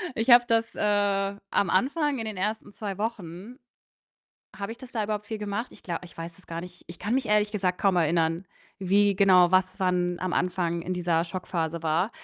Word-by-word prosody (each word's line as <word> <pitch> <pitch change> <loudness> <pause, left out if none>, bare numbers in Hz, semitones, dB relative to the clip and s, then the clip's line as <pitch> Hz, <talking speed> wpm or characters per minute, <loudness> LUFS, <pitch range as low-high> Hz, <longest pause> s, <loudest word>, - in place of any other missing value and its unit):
Ich 225 +2 -1
habe 240 0 +9
das, 230 0 +1
äh, 200 -1 +1
am 195 - +2
Anfang, 285 - +1
in 225 - -3
den 215 -3 -5
ersten 210 +2 -2
2 200 -2 -5
Wochen 210 - -5 1.0
habe 200 +2 -4
ich 235 - -13
das 260 -2 -11
da 220 -4 -1
überhaupt 210 0 -3
viel 220 -1 -4
gemacht? 210 +3 -3
Ich - - -16
gla 170 -2 -3
ich 170 - -14
weiß 165 0 -7
es 185 - -19
gar 165 0 -5
nicht. 180 0 -11
Ich 170 - -10
kann 210 +6 -1
mich 260 -2 0
ehrlich 210 0 +3
gesagt 185 -3 0
kaum 195 -3 +2
erinnern, 165 +1 +1 0.3
wie 200 +1 +3
genau 185 -3 +6
was 185 +1 +2
wann 180 -1 +1
am 185 -1 -2
Anfang 175 -2 0
in 180 - -3
dieser 170 -2 +1
Schockphase 170 -2 -3
war. 165 +6 +1
195 Hz, 205 wpm, -27 LUFS, 175-210 Hz, 1.0 s, habe